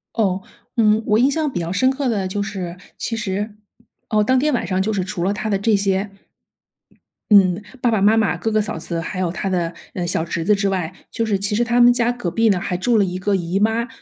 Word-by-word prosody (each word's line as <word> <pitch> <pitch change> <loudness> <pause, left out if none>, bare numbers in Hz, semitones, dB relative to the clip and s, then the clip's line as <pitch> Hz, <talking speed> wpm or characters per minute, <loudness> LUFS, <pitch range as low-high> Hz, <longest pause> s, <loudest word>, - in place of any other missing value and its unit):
哦。 195 -4 +1 0.3
嗯， 215 -2 +4
我 210 0 +3
印 265 +3 +4
象 310 +1 0
比 175 - -3
较 170 0 -3
深 260 +8 +2
刻 270 0 -2
的 205 -5 0
就 200 +2 -2
是， 190 -4 -5 0.2
其 230 - -3
实 205 0 -3 0.5
哦， 210 -2 +2
当 255 +3 +3
天 300 +2 +1
晚 240 - -1
上 185 +1 -1
就 215 +3 -1
是 195 -3 -1
除 190 -2 -4
了 190 +3 +1
他 210 +1 -3
的 205 - +1
这 205 +2 +2
些 195 0 0 1.2
嗯， 195 -2 +5 0.2
爸 240 - +2
爸 215 -4 +1
妈 210 +2 +5
妈， 195 -6 +1
哥 180 +6 -2
哥 215 - +3
嫂 210 -5 -3
子， 165 +1 -4
还 185 +3 -5
有 180 -2 0
他 190 +2 -3
的， 175 -3 -1 0.2
呃， 175 -2 -2
小 170 - 0
侄 170 -1 -3
子 210 - +4
之 200 0 0
外， 185 -3 -2 0.2
就 230 - -2
是 210 -3 0
其 200 +1 -1
实 240 - +2
他 240 +1 +1
们 240 0 +8
家 240 0 +1
隔 245 -8 -4
壁 225 +5 +2
呢， 185 -3 +1
还 180 - -2
住 225 +5 +2
了 205 - +4
一 180 -1 -3
个 200 +2 0
姨 180 0 -1
妈， 225 +3 +1
205 Hz, 270 characters per minute, -20 LUFS, 185-225 Hz, 1.2 s, 们